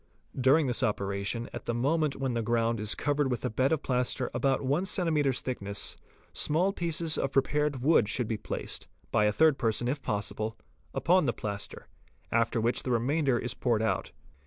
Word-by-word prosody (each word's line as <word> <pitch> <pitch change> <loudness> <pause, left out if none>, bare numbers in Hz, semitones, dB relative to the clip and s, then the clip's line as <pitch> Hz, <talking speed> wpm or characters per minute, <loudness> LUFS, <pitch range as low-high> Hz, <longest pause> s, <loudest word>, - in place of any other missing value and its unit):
During 135 +4 +4
this 125 -2 +1
operation, 100 +3 -1
at - - -7
the 120 - 0
moment 150 +4 +1
when 135 -2 -2
the 115 - 0
ground 115 0 +1
is 105 0 0
covered 145 -1 0
with 125 0 -2
a 125 - -1
bed 130 +5 +1
of 160 - 0
plaster 125 0 0
of - - -25
about 135 0 +1
one 140 +7 +1
centimeter's 155 -8 +1
thickness, 100 -6 -1 0.4
small 175 +6 +1
_ - - -25
pieces 165 -2 -1
of 135 - -1
prepared 140 -1 +1
wood 135 -8 +4
should 120 0 0
be 110 - -1
placed, - - -4 0.2
by 105 - +3
a 105 - +3
third 155 +5 +4
person 115 -1 0
if 140 +4 -1
rn - - -34
possible, 110 +2 -3 0.3
upon 180 -3 +3
the 120 - +1
plaster, 100 -2 -6 0.4
after 115 0 +2
which 115 +2 +1
the - - -5
remainder 130 +3 +2
is 120 0 -2
poured 115 -5 0
out. 110 - -1
125 Hz, 195 wpm, -29 LUFS, 115-145 Hz, 0.4 s, During